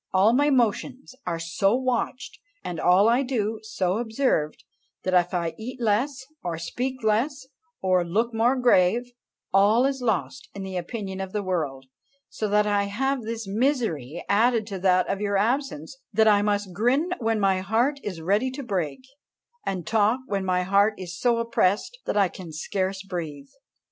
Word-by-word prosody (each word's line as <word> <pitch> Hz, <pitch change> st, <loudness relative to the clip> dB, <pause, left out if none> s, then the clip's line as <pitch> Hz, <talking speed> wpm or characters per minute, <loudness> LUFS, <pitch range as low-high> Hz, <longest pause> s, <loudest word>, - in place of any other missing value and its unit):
All 200 Hz, +5 st, +5 dB
my 290 Hz, +3 st, +3 dB
motions 260 Hz, +1 st, 0 dB
are 170 Hz, -1 st, -1 dB
so 175 Hz, +5 st, +1 dB
watched, 255 Hz, 0 st, -2 dB, 0.2 s
and 170 Hz, -3 st, -4 dB
all 185 Hz, +4 st, +5 dB
I 240 Hz, +3 st, +4 dB
do 225 Hz, -5 st, -1 dB
so 200 Hz, -2 st, -1 dB
observed, 225 Hz, -, 0 dB, 0.4 s
that 185 Hz, -, -1 dB
if 175 Hz, -1 st, +3 dB
I 170 Hz, -3 st, -1 dB
eat 250 Hz, +3 st, -7 dB
less, 250 Hz, +5 st, 0 dB, 0.2 s
or 170 Hz, -2 st, -3 dB
speak 250 Hz, +9 st, -4 dB
less, 255 Hz, +6 st, 0 dB, 0.4 s
or 185 Hz, -1 st, +3 dB
look 220 Hz, +8 st, 0 dB
more 235 Hz, +4 st, +3 dB
grave, 245 Hz, -1 st, +3 dB, 0.4 s
all 210 Hz, +6 st, +5 dB
is 270 Hz, -1 st, -1 dB
lost 140 Hz, -, -2 dB
in 195 Hz, -, -5 dB
the 190 Hz, -1 st, -6 dB
opinion 190 Hz, +1 st, -4 dB
of 190 Hz, -1 st, -6 dB
the 210 Hz, -1 st, -1 dB
world; 150 Hz, -8 st, -2 dB, 0.4 s
so 215 Hz, -, -3 dB
that 210 Hz, +1 st, +3 dB
I 205 Hz, -1 st, +1 dB
have 265 Hz, +6 st, -1 dB
this 225 Hz, -1 st, -5 dB
misery 195 Hz, -, -1 dB
added 225 Hz, +2 st, +3 dB
to 195 Hz, -2 st, -4 dB
that 185 Hz, -1 st, +3 dB
of 195 Hz, +1 st, -2 dB
your 200 Hz, -1 st, +1 dB
absence, 235 Hz, -, -1 dB, 0.2 s
that 220 Hz, +1 st, +3 dB
I 205 Hz, -1 st, +5 dB
must 205 Hz, -2 st, -1 dB
grin 250 Hz, -, +1 dB
when 225 Hz, -2 st, 0 dB
my 195 Hz, -2 st, +2 dB
heart 235 Hz, +9 st, +1 dB
is 185 Hz, -6 st, -5 dB
ready 205 Hz, +9 st, +1 dB
to 280 Hz, +1 st, -6 dB
break, 185 Hz, -, -2 dB, 0.7 s
and 185 Hz, -3 st, -2 dB
talk 220 Hz, +3 st, +2 dB
when 200 Hz, -6 st, -2 dB
my 180 Hz, -1 st, +1 dB
heart 200 Hz, +3 st, +3 dB
is 180 Hz, -2 st, -7 dB
so 235 Hz, +6 st, +2 dB
oppressed 230 Hz, -, 0 dB
that -, -, 0 dB
I 200 Hz, -2 st, +5 dB
can 175 Hz, -2 st, -10 dB
scarce 190 Hz, +4 st, -3 dB
breathe. 155 Hz, -7 st, -6 dB
205 Hz, 175 wpm, -25 LUFS, 185-240 Hz, 0.7 s, All